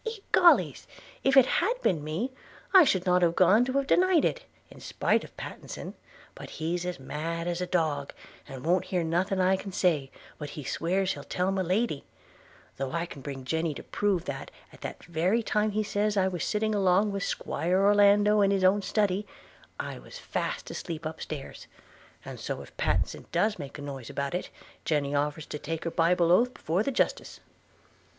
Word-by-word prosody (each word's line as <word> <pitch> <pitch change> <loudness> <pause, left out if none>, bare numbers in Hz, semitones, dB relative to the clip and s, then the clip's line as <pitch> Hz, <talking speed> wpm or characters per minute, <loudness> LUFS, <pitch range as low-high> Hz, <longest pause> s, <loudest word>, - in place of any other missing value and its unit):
– 450 -3 -7
Egollys! 350 -2 +5 0.4
if 270 0 +4
it 265 - +9
had 460 - +1
been 160 -5 +1
me, 170 - -3 0.4
I 380 -2 +10
should 190 -8 +1
not 180 0 +3
have 170 -1 +3
gone 190 +6 +5
to 255 - -3
have 275 0 +1
denied 360 +1 +4
it, - - -1 0.3
in - - -13
spite - - 0
of - - -14
Pattenson; - - -7 0.4
but - - -10
he's 170 +3 -3
as 180 - -4
mad 165 +5 -4
as 175 0 -2
a 180 - -2
dog, 155 -6 0 0.4
and 130 0 -9
won't 175 +2 +2
hear 180 -2 -1
nothing 180 +4 0
I 185 +1 +3
can 195 +1 -7
say, 160 -8 +1 0.3
but 150 -2 -5 0.2
swears 185 +9 0
he'll - - -9
tell 180 +1 -1
my 195 -1 0
Lady 185 -3 0 0.4
– - - -27
though 135 -1 -3
I 170 0 -1
can 145 -5 -10
bring 135 -1 -7
Jenny 160 +1 -1
to - - -8
prove 195 -4 0
that, - - -5 0.2
at - - -16
that - - -7
very 180 +7 +1
time 210 0 +1
as 205 - -7
he 215 - +2
says 205 0 0
I 190 -1 +3
was 180 -3 -3
sitting 215 +1 0
along 200 +1 +3
with 195 -1 -3
'Squire 180 +3 -1
Orlando 205 +1 +5
in 200 - +4
his 195 -1 +1
own 195 +2 +4
study, 205 -1 0 0.5
I - - -5
was - - -11
fast - - -4
asleep 165 -2 -6
up 155 0 -5
stairs 145 -3 -7 0.3
– - - -26
And - - -8
so - - -4
if - - -17
Pattenson - - -1
does 210 -2 +1
make 140 0 -7
a 145 - -8
noise 135 -4 -7
about 140 +2 -3
it, 180 - -3 0.3
Jenny 145 -2 0
offers 145 +1 -1
to 150 - -6
take 165 +2 -4
her 165 - -2
bible 170 0 +3
oath 245 +7 +4
before 170 +5 -1
the 250 - 0
Justice.' 260 - -1
180 Hz, 200 wpm, -28 LUFS, 160-205 Hz, 0.5 s, I